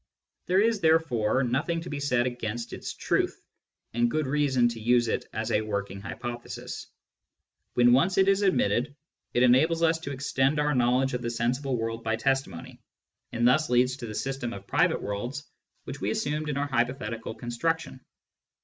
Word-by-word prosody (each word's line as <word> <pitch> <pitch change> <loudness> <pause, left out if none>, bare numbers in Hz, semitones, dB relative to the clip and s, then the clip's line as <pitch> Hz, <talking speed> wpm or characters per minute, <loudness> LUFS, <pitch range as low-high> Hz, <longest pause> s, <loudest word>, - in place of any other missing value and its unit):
There 185 +2 +3
is 220 0 +2
therefore 135 -7 +2
nothing 150 +7 -1
to 170 - -7
be 145 - -3
said 125 -4 +1
against 120 -2 -4
its - - -5
truth, - - 0 0.5
and 120 +1 +2
good 155 +3 0
reason 135 -3 +2
to 115 -1 -6
use 120 +1 +3
it - - -1
as 110 0 -3
a 105 - +2
working 100 -2 -4
hypothesis. 120 +4 -6 0.9
When 120 0 +5
once 180 +9 +3
it 190 0 +5
is 195 0 +3
admitted, 140 - +1 0.4
it 120 - +4
en 125 - +6
ables 160 +6 +3
us 165 0 +3
to 140 -3 -6
extend 135 +1 0
our 150 0 +2
knowledge 125 +1 +2
of 125 - -2
the 120 - -2
sensible 125 +3 -1
world 115 0 -3
by 110 0 0
testimony, 135 -7 -2 0.5
and 120 +1 +2
thus 155 +5 +3
leads 125 +1 +3
to 120 - -7
the 105 - -6
system 135 -2 -3
of 100 0 -9
private - - +1
worlds 120 +8 -4 0.4
which - - -8
we 100 - 0
assumed 150 +6 -2
in 145 - -2
our 140 - 0
hypothetical 120 -4 -2
construc 125 +8 -1
tion. 135 -3 -10
125 Hz, 180 wpm, -27 LUFS, 120-145 Hz, 0.9 s, en